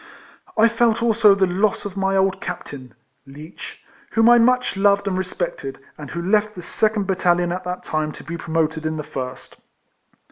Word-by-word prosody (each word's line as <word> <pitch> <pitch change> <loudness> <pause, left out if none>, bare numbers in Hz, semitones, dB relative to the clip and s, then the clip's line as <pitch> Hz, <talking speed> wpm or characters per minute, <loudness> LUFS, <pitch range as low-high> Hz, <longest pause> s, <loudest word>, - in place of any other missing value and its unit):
I 220 +1 +6
felt 230 0 +1
also 220 -3 +5
the 195 -1 +3
loss 195 +4 0
of 200 -2 -6
my 195 0 0
old 190 0 +1
Captain 130 -4 -7 0.3
(Leech), 150 +4 -11 0.3
whom 225 +1 +5
I 240 - +7
much 250 0 +2
loved 200 +1 +3
and 190 - 0
respected, 175 -7 -4 0.2
and 150 -3 -9
who 170 0 -5
left 215 +3 +1
the 180 - -8
second 215 +2 0
battalion 175 -2 +1
at 185 +1 -4
that 180 0 -4
time 155 0 -2
to - - -11
be 170 - -6
promoted 160 -1 -1
in 155 0 -3
the 150 - -4
first. 130 -2 -7
190 Hz, 180 wpm, -21 LUFS, 160-210 Hz, 0.3 s, I